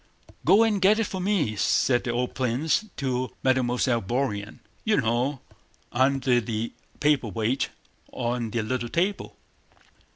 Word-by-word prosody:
"Go 215 +3 +6
and 210 -3 +1
get 200 +3 +5
it 225 - +2
for 190 -3 -4
me," 180 - +1
said 120 +4 +2
the - - -2
old 125 +1 -1
prince 135 - 0
to 130 -2 -1
Mademoiselle 125 -2 +2
Bourienne. 105 -2 -2 0.3
"You 215 -1 +2
know—under 130 +1 0
the 110 +1 -3 0.3
paperweight 130 -3 +1 0.4
on 120 -1 -2
the 115 0 -1
little 120 +2 -2
table." 185 - -1
125 Hz, 125 wpm, -26 LUFS, 120-145 Hz, 0.4 s, Go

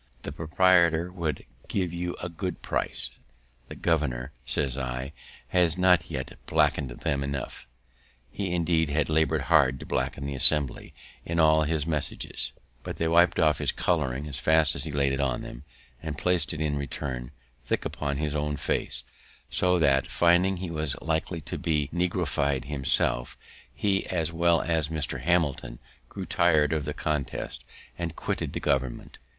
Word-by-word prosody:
The - - -5
proprietor 85 0 +3
would 85 -4 -3 0.2
give 90 -3 -1
you 90 0 -3
a - - -1
good 90 +1 -5
price." - - -1 0.6
"The - - -7
governor," 70 -6 0 0.2
says 70 -3 0
I, 65 +1 -4 0.4
"has 90 -2 +3
not 90 -3 +4
yet 65 0 -5
blacked - - +3 0.2
them 70 -1 0
enough." 70 -3 -5 0.6
He, 95 0 -3
indeed, 85 -2 +1
had 75 +1 0
laboured 80 0 +2
hard 65 -1 +4
to - - -8
blacken 70 - -2
the 70 - -3
Assembly 70 +1 +2 0.3
in 85 0 -2
all 80 -1 +5
his 75 -1 0
messages, 75 -3 -2 0.3
but - - -6
they 80 - 0
wip'd 85 +2 +4
off 80 -2 +3
his - - +1
colouring 75 -5 0
as 70 -4 -6
fast 80 -2 +5
as 70 - -1
he 80 - -4
laid 70 -1 +1
it 70 - -2
on, 65 -2 -3 0.4
and 75 -3 -5
plac'd 90 +1 +2
it, 75 - -5
in 75 -2 0
return, 65 -3 -4 0.4
thick - - -1
upon 70 -1 -2
his 75 0 -2
own 75 0 -1
face; - - -2 0.5
so 90 0 +2
that, 70 -5 +3
finding 90 +2 +3
he 90 -1 -5
was 75 -4 -1
likely 80 +1 -2
to - - -6
be 75 -5 0
negrofied 80 -6 0
himself, 65 -3 +1 0.3
he, 100 -2 0
as 85 -3 -1
well 85 0 +3
as 80 -3 +1
Mr. 80 -2 -3
Hamilton, 80 -8 0 0.3
grew - - -6
tir'd 80 -3 +3
of 75 -2 -1
the - - -3
contest, 75 -4 -3 0.4
and 85 -1 -3
quitted - - -3
the - - -2
government. 65 -3 -2
80 Hz, 160 wpm, -27 LUFS, 70-85 Hz, 0.6 s, all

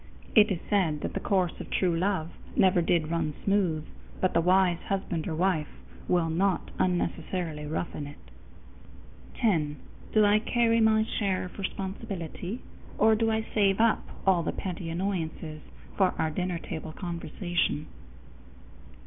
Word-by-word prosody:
It 215 -2 +7
is 190 - 0
said 165 -8 +1
that - - -3
the - - -1
course 185 -3 0
of - - -7
true 180 -3 +1
love 175 -2 0 0.2
never 185 -2 +4
did 165 -1 +1
run 160 -3 -1
smooth, 180 -6 +1 0.3
but 185 - +1
the 170 - +4
wise 180 0 +4
husband 185 -4 -2
or 160 - -2
wife 170 -3 +1 0.4
will 170 -2 +2
not 185 +2 +1
unnecessarily 175 -3 -1
roughen 150 -1 -3
it. 145 - -10 1.2
_10. 160 -10 +1 0.4
Do 215 -1 +5
I 205 +1 +5
carry 230 +1 +2
my 220 0 +5
share 200 -5 -1
of 180 - -10
responsibility, 195 - -5 0.3
or 220 +1 +5
do 225 +1 +2
I 220 0 0
save 195 -2 +3
up 230 -1 +3 0.2
all 190 -3 +4
the 160 - -1
petty 175 -3 -5
annoyances 165 -3 -3 0.3
for 190 -2 +3
our 160 - 0
dinner 180 +1 -1
table 160 -1 -6
conversation? 170 -3 -2
180 Hz, 145 wpm, -28 LUFS, 165-200 Hz, 1.2 s, It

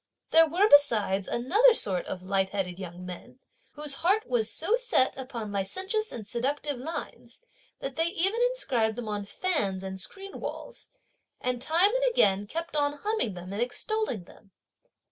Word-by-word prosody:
There 325 0 +7
were 360 +7 +3
besides 215 - +4
another 420 - +4
sort 190 - +1
of 180 -1 -5
light 190 0 +1
headed 190 -2 -3
young 180 -1 -8
men, 185 +8 -9 0.4
whose 295 -1 -5
heart 395 +6 +2
was 230 -3 0
so 405 +8 +1
set - - +2
upon 245 -5 -6
licentious 380 - -2
and 220 -3 -7
seductive 270 +5 -2
lines, 320 +6 -7 0.4
that 270 0 -5
they 325 +1 +3
even 390 +5 +1
inscribed 260 - +1
them 240 -2 -5
on 205 -1 -3
fans 200 - -1
and 190 0 -5
screen 390 - -7
walls, - - -7 0.5
and 250 -1 -2
time 340 +9 +4
and - - +1
again 205 - +3
kept 330 +5 -5
on 290 -1 +2
humming 425 - -1
them 180 +2 -8
and 205 - -2
extolling 250 - -2
them. 195 +3 -19
255 Hz, 165 wpm, -28 LUFS, -, 0.5 s, There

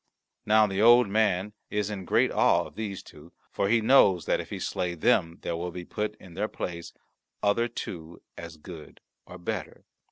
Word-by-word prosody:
Now 110 0 +5
the 95 -1 -2
Old 120 +1 +7
Man 105 -1 +1 0.2
is 105 0 -2
in 95 -3 -6
great - - +2
awe - - +3
of - - -12
these 105 -3 -5
two, 75 +3 -15 0.2
for 100 - -1
he 115 +1 +3
knows 100 - +5
that - - +1
if - - -11
he - - -5
slay 90 -1 -3
them 85 +1 +1
there 85 - -2
will 85 +2 -4
be 90 0 -8
put 105 +3 -3
in 90 -4 -15
their 100 +5 -2
place 85 -5 -6 0.5
other 105 +4 +2
two 85 -7 -8 0.2
as 85 -1 -9
good 80 -1 -12 0.3
or 90 - -10
better. 90 - -6
95 Hz, 190 wpm, -27 LUFS, 85-105 Hz, 0.5 s, Old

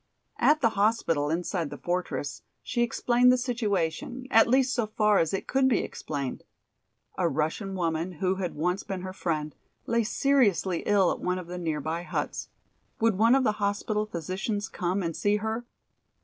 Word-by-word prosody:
At 300 0 +4
the 230 - +4
hospital 200 -9 +1
inside 170 0 -1
the - - -7
fortress 160 -6 -3 0.2
she 240 - -1
explained 240 +1 +3
the 255 - +4
situation, 240 -1 -2
at 225 - +6
least 260 +1 +3
so 235 -4 0
far 210 -1 +3
as 165 - +1
it 195 - -2
could 265 0 +2
be 245 -5 +2
explained. 140 -4 -5 0.8
A - - +2
Russian 160 +7 -2
woman, 170 0 -1
who 185 +3 -1
had 180 -3 -3
once 180 +5 0
been 190 -2 -5
her 185 0 -5
friend, 155 -5 -2 0.3
lay 230 0 +1
seriously 210 -8 +2
ill 200 -4 +4
at - - -3
one 180 0 -1
of 180 - -6
the 180 +1 -6
nearby 160 0 -2
huts. 175 - -4 0.5
Would 225 -4 +2
one 230 +3 +6
of 270 - +3
the 215 -3 0
hospital 210 +1 0
physicians 195 +4 -3
come 185 +1 -1
and 165 -2 -2
see 205 0 +2
her? 220 +3 -2
195 Hz, 175 wpm, -27 LUFS, 170-225 Hz, 0.8 s, at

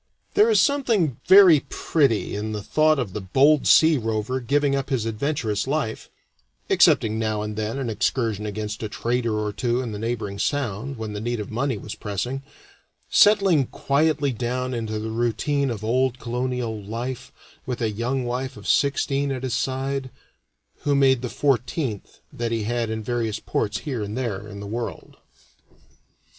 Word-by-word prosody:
There 425 +3 +5
is 440 - +4
something 230 - +2
very 185 -5 +8
pretty 135 -12 +1
in 110 +1 -3
the 105 -1 -4
thought 155 +7 +3
of 120 -8 -3
the 105 - -4
bold 135 +10 +3
sea 160 -3 +6
rover 115 +3 -2
giving 140 +3 +1
up 135 0 -2
his 130 -5 0
adventurous 115 -1 -1
life 135 -6 -2 0.6
(excepting 110 0 +4
now 110 -1 -1
and 105 0 -5
then 110 +3 -3
an 135 -3 -2
excursion 110 -1 -1
against 105 +1 -4
a 110 - -3
trader 120 0 -1
or 105 -1 -2
two 120 +3 0
in 125 -3 -3
the 105 - -5
neighboring 110 -3 -3
sound, 135 0 -2
when 110 -1 -5
the 105 - -5
need 120 0 -2
of 105 - -6
money 125 +1 -1
was 105 - -7
pressing); 120 +6 -4 0.7
settling 195 - +5
quietly 145 0 +1
down 125 +2 -2
into 110 -2 -3
the 110 +1 -4
routine 130 +5 0
of 110 -3 -5
old 125 +2 +1
colonial 125 -2 -3
life, 120 +5 -5 0.4
with 125 -2 -3
a 115 -3 0
young 125 +5 -2
wife 125 +1 -3
of 105 - -10
sixteen 140 0 +1
at 130 -1 -4
his 130 -3 -2
side, 135 +2 -2 0.7
who 145 -1 +1
made 135 -3 +4
the 125 - -3
fourteenth 130 - -1
that 115 -1 -3
he 115 -2 -1
had 120 +1 -1
in 110 0 -3
various 115 -2 -2
ports 105 -1 -2
here 130 -7 -3
and 105 +3 -4
there 105 -6 -3
in 100 -1 -8
the - - -6
world. 115 +3 -6
120 Hz, 170 wpm, -24 LUFS, 110-135 Hz, 0.7 s, very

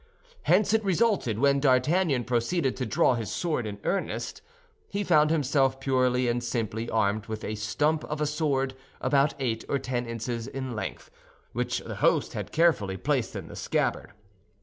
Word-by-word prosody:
Hence, 205 +3 +4
it 220 0 +3
resulted 195 - +1
when 140 +3 +3
D'Artagnan 135 +2 +3
proceeded 125 +5 0
to 130 - -2
draw 155 -4 +3
his 115 -3 -3
sword 155 -10 -1
in 100 -1 -5
earnest, 195 - -2 0.5
he 205 - -2
found 155 -5 +4
himself 135 -3 +2
purely 130 -2 +2
and 120 0 0
simply 115 -1 -2
armed 105 0 0
with 110 -1 -5
a 110 - -3
stump 150 +9 0
of 150 0 -4
a 150 - +1
sword 145 -3 0 0.3
about 140 +1 +2
eight 115 -5 -2
or 140 - +2
ten 125 -2 -3
inches 115 0 -4
in 130 -3 -5
length, 110 - -5 0.4
which - - -1
the - - -7
host - - +2
had - - -5
carefully 150 - +2
placed 130 +2 -1
in - - -5
the - - -10
scabbard. - - -1
130 Hz, 170 wpm, -27 LUFS, 115-150 Hz, 0.5 s, Hence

